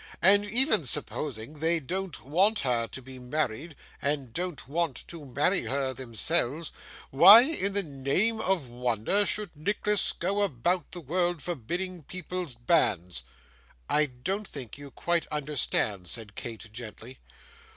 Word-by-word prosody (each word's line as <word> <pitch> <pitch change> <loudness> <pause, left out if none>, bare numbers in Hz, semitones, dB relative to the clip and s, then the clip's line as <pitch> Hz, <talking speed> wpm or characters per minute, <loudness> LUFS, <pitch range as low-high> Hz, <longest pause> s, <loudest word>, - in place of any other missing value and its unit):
And 200 +3 +6
even 215 - +3
supposing 140 +2 -3
they 165 +2 +2
don't 180 +1 -4
want 190 +10 +3
her 120 -3 0
to 130 - -8
be 130 0 -11
married, 145 +3 -2 0.3
and 140 -4 -2
don't 175 -5 -4
want 155 -2 -2
to 165 -4 -7
marry 145 +9 0
her 135 -1 -1
themselves, 130 +5 -1 0.4
why 195 - +10
in 255 -9 +1
the 200 0 +2
name 155 +10 0
of 180 -8 0
wonder 120 - 0
should 210 -5 -2
Nicholas 205 +6 +2
go 195 +4 -1
about 175 - 0
the 175 +1 -6
world, 175 +2 -1
forbidding 175 +4 -4
people's 180 -3 -6
banns?' 90 - +1 0.7
'I 150 0 +4 0.2
don't 195 +3 -2
think 130 -6 -6
you 145 0 -10
quite 170 +4 -1
understand,' 135 -10 -1
said 105 +1 -5
Kate, 115 -1 -8
gently. 120 +2 -9
150 Hz, 140 wpm, -28 LUFS, 125-185 Hz, 0.7 s, why